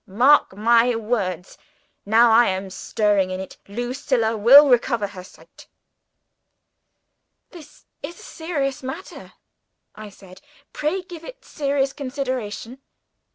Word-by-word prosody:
Mark 240 Hz, 0 st, +3 dB
my 235 Hz, +2 st, +3 dB
words! 210 Hz, -6 st, -3 dB, 0.5 s
Now 225 Hz, +2 st, +5 dB
I 235 Hz, +2 st, +5 dB
am 190 Hz, 0 st, -3 dB
stirring 205 Hz, -1 st, 0 dB
in 185 Hz, 0 st, -5 dB
it, 190 Hz, -, -9 dB
Lucilla 240 Hz, +1 st, -2 dB
will 265 Hz, +8 st, +7 dB
recover 235 Hz, -3 st, +1 dB
her 195 Hz, -2 st, -9 dB
sight." -, -, -18 dB, 1.8 s
"This 310 Hz, -4 st, -15 dB, 0.2 s
is 335 Hz, +4 st, -8 dB
a -, -, -14 dB
serious 290 Hz, -5 st, -4 dB
matter," 270 Hz, +8 st, -9 dB, 0.6 s
I 215 Hz, -1 st, -10 dB
said. 190 Hz, -1 st, -16 dB, 0.3 s
"Pray 340 Hz, +6 st, -2 dB
give 345 Hz, -3 st, -11 dB
it -, -, -12 dB
serious 275 Hz, -2 st, -2 dB
consideration." 255 Hz, -3 st, -5 dB
240 Hz, 115 wpm, -21 LUFS, 205-280 Hz, 1.8 s, will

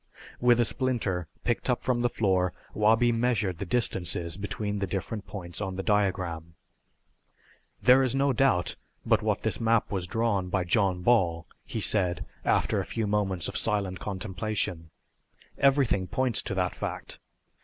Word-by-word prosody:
With 120 Hz, -1 st, +4 dB
a 120 Hz, -, +4 dB
splinter 110 Hz, -, -1 dB, 0.2 s
picked 120 Hz, +2 st, -1 dB
up 125 Hz, -, +1 dB
from 125 Hz, -2 st, +1 dB
the 120 Hz, -, +2 dB
floor 95 Hz, -5 st, +1 dB, 0.2 s
Wabi 110 Hz, +3 st, +4 dB
measured 115 Hz, -7 st, 0 dB
the 100 Hz, -, -4 dB
distances 85 Hz, -6 st, -1 dB
between 105 Hz, +1 st, -3 dB
the 100 Hz, -, -1 dB
different 100 Hz, +3 st, -4 dB
points 85 Hz, -2 st, -7 dB
on 95 Hz, -2 st, -3 dB
the 95 Hz, -, -4 dB
diagram. 90 Hz, -6 st, 0 dB, 1.3 s
"There 130 Hz, +1 st, +7 dB
is 130 Hz, -1 st, +1 dB
no 135 Hz, 0 st, +2 dB
doubt 125 Hz, -8 st, +2 dB, 0.3 s
but -, -, +3 dB
what -, -, -1 dB
this -, -, -1 dB
map 115 Hz, -1 st, +2 dB
was 95 Hz, -3 st, -2 dB
drawn 105 Hz, -3 st, 0 dB
by 95 Hz, 0 st, 0 dB
John 90 Hz, 0 st, +1 dB
Ball," 90 Hz, -8 st, +2 dB, 0.2 s
he -, -, -4 dB
said 90 Hz, -4 st, +2 dB, 0.2 s
after -, -, +2 dB
a -, -, -1 dB
few 115 Hz, -2 st, -1 dB
moments 100 Hz, -4 st, 0 dB
of -, -, -6 dB
silent 100 Hz, -3 st, 0 dB
contemplation. 95 Hz, -4 st, -3 dB, 0.7 s
"Everything 135 Hz, -9 st, +3 dB
points 130 Hz, +2 st, 0 dB
to 95 Hz, -, -4 dB
that 90 Hz, -1 st, 0 dB
fact. -, -, -6 dB
100 Hz, 155 wpm, -28 LUFS, 90-115 Hz, 1.3 s, There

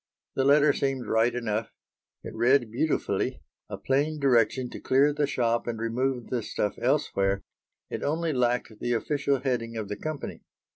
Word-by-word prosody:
The 135 Hz, -, 0 dB
letter 145 Hz, +1 st, +5 dB
seemed 135 Hz, -3 st, -1 dB
right 110 Hz, +2 st, +2 dB
enough. 115 Hz, -2 st, -2 dB, 0.5 s
It -, -, -7 dB
read 120 Hz, 0 st, +3 dB
beautifully, 150 Hz, +7 st, -1 dB, 0.3 s
a -, -, -5 dB
plain 145 Hz, +3 st, 0 dB
direction 125 Hz, -1 st, +3 dB
to -, -, -7 dB
clear 140 Hz, +3 st, +3 dB
the 145 Hz, -1 st, 0 dB
shop 120 Hz, -4 st, 0 dB
and 115 Hz, -1 st, -2 dB
remove 120 Hz, +3 st, -2 dB
the 125 Hz, -2 st, 0 dB
stuff 105 Hz, -1 st, -2 dB
elsewhere; 100 Hz, 0 st, +1 dB, 0.5 s
it -, -, -3 dB
only 160 Hz, +2 st, 0 dB
lacked 120 Hz, -3 st, 0 dB
the 120 Hz, -, -1 dB
official 140 Hz, +2 st, 0 dB
heading 115 Hz, -4 st, -2 dB
of 105 Hz, -2 st, -4 dB
the 105 Hz, -, -4 dB
company. 155 Hz, -2 st, -5 dB
125 Hz, 160 wpm, -27 LUFS, 115-140 Hz, 0.5 s, letter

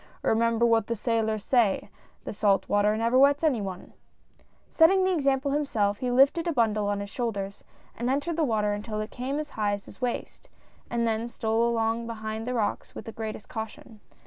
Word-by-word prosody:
Remember 230 Hz, +1 st, +2 dB
what 225 Hz, -2 st, +3 dB
the 235 Hz, -, -1 dB
sailors 220 Hz, -2 st, -1 dB
say, 230 Hz, -5 st, +1 dB, 0.3 s
that -, -, -5 dB
salt 200 Hz, -2 st, +2 dB
water 205 Hz, +1 st, +2 dB
never 230 Hz, +3 st, +2 dB
wets 280 Hz, +3 st, +4 dB
any 275 Hz, -9 st, +2 dB
one! 190 Hz, -2 st, -7 dB, 0.4 s
" -, -, -35 dB
Setting 375 Hz, +4 st, +5 dB
the 375 Hz, 0 st, +2 dB
example 275 Hz, -3 st, +1 dB
himself, 220 Hz, -9 st, 0 dB
he 250 Hz, -, -1 dB
lifted 275 Hz, +7 st, +4 dB
a -, -, +2 dB
bundle 215 Hz, -6 st, +1 dB
on 205 Hz, 0 st, -1 dB
his 200 Hz, -, -6 dB
shoulders, 200 Hz, -5 st, -4 dB, 0.3 s
and 240 Hz, +2 st, -2 dB
entered 290 Hz, +5 st, 0 dB
the 325 Hz, -, +1 dB
water 215 Hz, -6 st, +1 dB
until 215 Hz, +1 st, -4 dB
it 215 Hz, +1 st, -4 dB
came 260 Hz, +3 st, -3 dB
as 300 Hz, -1 st, -4 dB
high 210 Hz, -2 st, 0 dB
as 200 Hz, 0 st, -5 dB
his -, -, -15 dB
waist, 245 Hz, -1 st, -4 dB, 0.4 s
and 235 Hz, -1 st, 0 dB
then 225 Hz, +1 st, -1 dB
stole 230 Hz, 0 st, 0 dB
along 230 Hz, 0 st, 0 dB
behind 220 Hz, 0 st, -5 dB
the 250 Hz, -, -1 dB
rocks 215 Hz, -3 st, -2 dB
with -, -, -8 dB
the 225 Hz, -, -6 dB
greatest 220 Hz, -1 st, -6 dB
caution. 220 Hz, 0 st, -7 dB
230 Hz, 200 wpm, -27 LUFS, 215-255 Hz, 0.4 s, Setting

